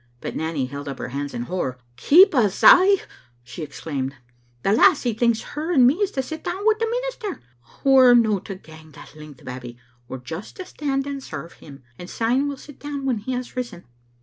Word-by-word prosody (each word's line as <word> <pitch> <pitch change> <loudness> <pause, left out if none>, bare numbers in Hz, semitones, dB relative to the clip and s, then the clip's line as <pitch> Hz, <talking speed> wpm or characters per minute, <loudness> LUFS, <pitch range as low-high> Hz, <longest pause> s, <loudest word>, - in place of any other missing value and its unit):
" 120 - -38
But - - -5
Nanny 160 -4 -2
held 140 +2 -8
up 135 -1 -5
her - - -6
hands 140 +2 -4
in 120 - -4
horror. 130 -4 -3
" - - -37
Keep 360 +6 +8
us 215 -8 +1
a' 390 +2 +8 0.2
!" 120 0 -34
she 130 +7 -9
exclaimed; 140 -2 -5 0.3
" 120 0 -37
the 195 - +2
lassie 240 +2 +4
thinks 230 0 +1
her 315 +4 -3
and 265 -8 +5
me 255 - +6
is 405 -1 0
to 265 - -1
sit 315 +4 -7
down 370 +4 -4
wi' 440 - +6
the 455 - 0
minister! 485 -5 -4 0.4
We're 260 -2 +7
no 220 -4 +3
to 195 +1 -8
gang 160 -3 -15
that 140 - -14
length. 150 -3 -13
Babbie; 125 -1 -8 0.3
we're 130 - -6
just 160 +10 -8
to 370 - -7
stand 275 -5 -3
and 280 -1 -5
serve 170 -9 -8
him, 140 -3 -14 0.2
and 180 - -9
syne 250 +5 0
we'll 285 -1 -4
sit 290 +1 -14
down 285 -2 -5
when 250 -5 0
he 255 +5 -4
has 250 0 -5
risen." 235 -9 -5
225 Hz, 225 wpm, -22 LUFS, -, 0.4 s, Keep